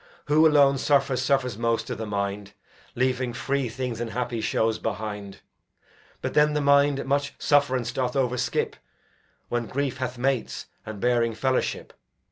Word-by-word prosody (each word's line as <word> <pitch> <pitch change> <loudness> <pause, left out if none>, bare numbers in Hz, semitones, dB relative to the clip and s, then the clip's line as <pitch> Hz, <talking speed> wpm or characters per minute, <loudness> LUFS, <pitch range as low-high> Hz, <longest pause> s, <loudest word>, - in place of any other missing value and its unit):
Who 155 +2 +5
alone 140 -3 +4
suffers 135 -2 +2
suffers 125 -5 0
most 115 -1 0
i' - - 0
th' 110 - -5
mind, 100 0 -3 0.4
Leaving 125 -1 0
free 140 -1 -1
things 120 -1 -4
and 120 - -3
happy 120 -1 -2
shows 110 0 0
behind; 105 -2 -5 0.8
But - - -2
then 150 0 +4
the - - +2
mind 140 -1 +3
much 140 +1 0
sufferance 130 -5 +2
doth 125 +1 -2
o'erskip 125 -2 0 0.7
When 120 -1 -1
grief 135 0 -2
hath 130 -1 -4
mates, 130 -1 -1 0.2
and 110 -2 -6
bearing 120 0 +1
fellowship. 130 +3 -1
125 Hz, 145 wpm, -25 LUFS, 115-140 Hz, 0.8 s, Who